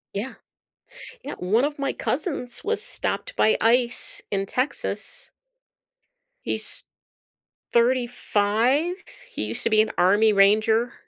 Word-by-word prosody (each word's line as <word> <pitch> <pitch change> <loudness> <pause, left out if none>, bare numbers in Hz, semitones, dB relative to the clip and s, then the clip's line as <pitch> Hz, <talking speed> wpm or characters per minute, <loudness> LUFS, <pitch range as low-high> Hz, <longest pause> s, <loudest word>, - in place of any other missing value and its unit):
Yeah. 220 +7 -4 0.9
Yeah, - - -6
one 215 +8 +2
of 290 0 -4
my 275 -1 0
cousins 270 -4 -2
was 445 +1 -1
stopped - - -3
by 220 - +3
ICE 240 +1 +2
in 195 -1 -1
Texas. 255 +7 -3 1.2
He's - - -2 0.9
35, 240 - +1 0.3
he 480 - -4
used - - -2
to - - +3
be 215 -1 +4
an 220 - -3
army 205 +5 +4
ranger. 215 +4 +3
235 Hz, 115 wpm, -24 LUFS, 215-265 Hz, 1.2 s, be